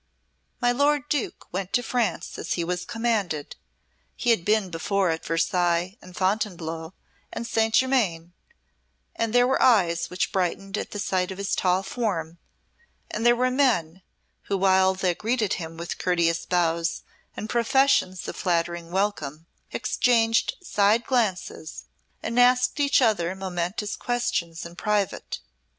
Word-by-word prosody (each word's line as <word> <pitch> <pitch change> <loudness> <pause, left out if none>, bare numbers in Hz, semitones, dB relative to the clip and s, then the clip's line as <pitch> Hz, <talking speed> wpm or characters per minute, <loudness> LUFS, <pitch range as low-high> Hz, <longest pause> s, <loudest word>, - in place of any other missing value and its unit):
My 245 0 +3
lord 285 +2 +2
Duke 290 -4 -2
went 185 +1 -4
to 245 - +2
France 240 -1 -2
as - - -2
he 170 - -1
was 180 +1 -3
commanded; 210 -11 -2 0.6
he 240 - +1
had 220 -7 +2
been 210 -1 +1
before 185 +2 0
at 160 - -4
Versailles 175 +2 0
and 180 -1 -13
Fontainebleau 180 -4 -2 0.4
and 235 - -5
Saint 225 -1 +1
Germain, 190 -11 +1 0.8
and 230 -1 -1
there 245 +1 +5
were 265 +1 +1
eyes 170 -8 +3
which 180 - -1
brightened 195 +1 -1
at - - -4
the - - -6
sight 185 -2 0
of 190 - -6
his 200 0 -2
tall 185 +1 +1
form, 175 -8 -3 0.7
and 220 - -3
there 240 0 +6
were 255 +1 +1
men 190 - +1 0.4
who 200 - -1
while 190 0 +4
they 185 -2 +1
greeted 220 +1 0
him 165 0 -7
with 170 +1 -5
courteous 170 -2 +1
bows 170 -2 0 0.3
and 215 - -4
professions 235 -5 +2
of - - -5
flattering 170 -2 -1
welcome 170 -6 -2 0.3
exchanged 230 - +2
side 210 - +2
glances 195 -9 -2 0.4
and 230 +2 0
asked 250 +2 +4
each 280 -2 +4
other 190 -6 +1
momentous 190 +2 -3
questions 170 -10 -2
in 170 0 -10
private. 210 -1 -1
195 Hz, 145 wpm, -25 LUFS, 170-230 Hz, 0.8 s, there